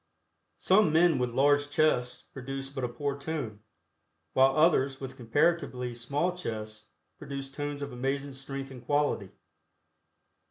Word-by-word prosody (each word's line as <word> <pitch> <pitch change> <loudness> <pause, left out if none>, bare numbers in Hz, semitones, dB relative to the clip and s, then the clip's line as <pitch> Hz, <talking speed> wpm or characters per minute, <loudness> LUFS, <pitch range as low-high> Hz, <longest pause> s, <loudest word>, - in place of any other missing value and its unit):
Some 190 -3 +4
men 165 -2 +4
with 125 -1 +1
large 145 +3 +3
chests 135 -5 +1
produce 135 +1 -5
but 135 -2 -5
a - - +1
poor 140 +3 -2
tone, 140 -8 -4 0.7
while 135 +2 +4
others 140 -4 +3
with 135 -1 -7
comparatively 125 0 0
small 140 +9 -1
chests 110 -9 -6 0.3
produce 140 -2 -6
tones 145 0 -4
of 140 - -6
amazing 135 +3 -2
strength 135 0 -6
and 125 -2 -10
quality. 145 -8 +1
135 Hz, 130 wpm, -29 LUFS, 125-145 Hz, 0.7 s, Some